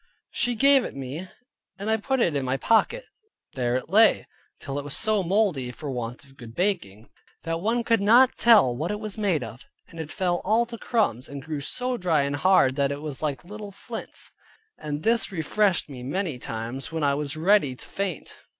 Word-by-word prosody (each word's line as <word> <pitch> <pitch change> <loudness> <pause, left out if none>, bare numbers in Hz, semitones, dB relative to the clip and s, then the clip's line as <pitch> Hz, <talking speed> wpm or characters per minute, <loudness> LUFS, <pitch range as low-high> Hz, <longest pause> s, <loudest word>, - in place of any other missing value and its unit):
She 240 0 0
gave 275 +2 +5
it - - -6
me, 140 +7 -6 0.5
and 200 +1 -6
I 220 0 +3
put 265 +4 -1
it 170 -9 +2
in 140 - 0
my 130 +1 -1
pocket; 355 - +2 0.5
there 125 -2 0
it 130 - -2
lay, 215 +5 +5 0.3
till 140 +1 -4
it - - -5
was 145 0 -5
so 215 -2 +1
moldy 180 - +1
(for 140 +3 -6
want 120 -1 -5
of 135 0 -20
good 115 -1 -11
baking) 170 - -2 0.3
that 165 0 -2
one 230 +4 +1
could 230 -2 +2
not 240 +5 +6
tell 210 - +5
what 155 +7 -3
it 210 - -2
was 215 -2 -5
made 185 -10 +1
of; 115 +2 -9 0.3
it 160 -2 -7
fell 175 -2 0
all 220 +4 +3
to 235 0 -8
crumbs, 195 - 0
and 140 -1 -7
grew 155 -3 -4
so 250 - -2
dry 165 -7 +2
and 140 +1 -2
hard, 145 -5 +4
that 140 -1 +2
it 140 +1 -5
was 145 -3 -6
like 150 -1 -3
little 210 +2 -8
flints; 225 +4 -6 0.5
and 150 0 -4
this 230 -1 +2
refreshed 190 +2 +1
me 135 -4 -9
many 150 +1 -3
times, 115 +5 -5
when 160 -1 -2
I 140 -1 +3
was 145 +1 -3
ready 165 -5 +3
to - - -13
faint. 195 -6 -4
165 Hz, 205 wpm, -25 LUFS, 140-210 Hz, 0.5 s, not